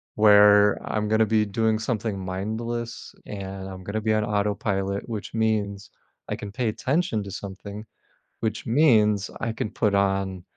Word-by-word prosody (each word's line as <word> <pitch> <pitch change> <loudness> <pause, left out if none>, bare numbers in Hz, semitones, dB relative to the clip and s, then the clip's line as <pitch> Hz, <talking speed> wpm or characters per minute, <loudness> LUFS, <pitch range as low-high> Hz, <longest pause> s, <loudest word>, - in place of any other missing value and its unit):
where 105 -1 +6
I'm 105 -1 -1
gonna 110 +1 +4
be 110 0 +2
doing 110 +2 +1
something 110 -2 -2
mindless, 110 +6 -4
and 95 -1 -6
I'm 95 -1 -8
gonna 100 +3 -3
be 110 0 +1
on 110 0 +1
autopilot, 100 -1 -1
which 110 -3 -5
means 105 -3 -1 0.4
I - - -2
can 100 -1 -8
pay 120 -1 0
attention 140 - 0
to 100 - -8
something, 100 +2 -7 0.6
which 110 -1 -2
means 110 -6 +3
I 115 - -2
can 110 - -3
put 105 -3 +1
on, 95 -2 0
105 Hz, 155 wpm, -25 LUFS, 100-110 Hz, 0.6 s, where